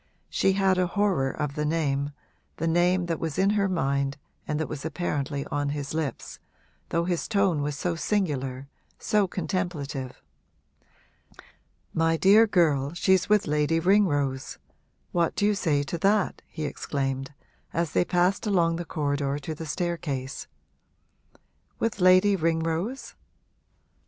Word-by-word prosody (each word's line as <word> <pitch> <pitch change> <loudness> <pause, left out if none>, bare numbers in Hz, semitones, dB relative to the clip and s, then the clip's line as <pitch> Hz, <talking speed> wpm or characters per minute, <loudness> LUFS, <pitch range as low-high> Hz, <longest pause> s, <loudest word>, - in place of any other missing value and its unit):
She 195 - +2
had 190 -1 +2
a 180 - +2
horror 190 -9 +1
of 145 +1 -3
the 150 - -2
name, 145 -3 0 0.5
the 165 - -2
name 175 +2 +2
that 165 -1 -2
was 160 -2 -3
in 195 +2 +3
her 200 -2 +1
mind 140 -4 0 0.3
and 150 0 -1
that 160 - -1
was 150 -2 -6
apparently 145 -3 -2
on 145 0 0
his 145 0 -4
lips, 155 -4 -4 0.5
though 170 - +1
his 175 -2 -1
tone 195 -8 +2
was 145 0 -2
so 175 +2 -1
singular, 140 -8 -2 0.3
so 210 -2 +1
contemplative. 155 -7 -3 1.7
'My 165 0 +2
dear 210 +6 +6
girl, 155 -7 +2
she's 185 +2 +2
with 210 -1 +4
Lady 150 +2 +1
Ringrose 145 -8 +1 0.5
what 170 -2 +1
do 205 - +1
you 210 - +3
say 155 -8 +1
to 165 +4 -4
that?' 200 +2 +1
he 155 -2 -5
exclaimed, 135 -1 -3 0.4
as 170 -1 -1
they - - +3
passed 180 +5 +1
along 170 -4 +2
the 175 - -5
corridor 145 -3 -1
to 145 +2 -5
the 160 +1 -7
staircase. 150 -6 -3 1.3
'With 225 -4 -2
Lady 185 +2 +6
Ringrose?' 165 +7 -1
165 Hz, 140 wpm, -26 LUFS, 145-185 Hz, 1.7 s, dear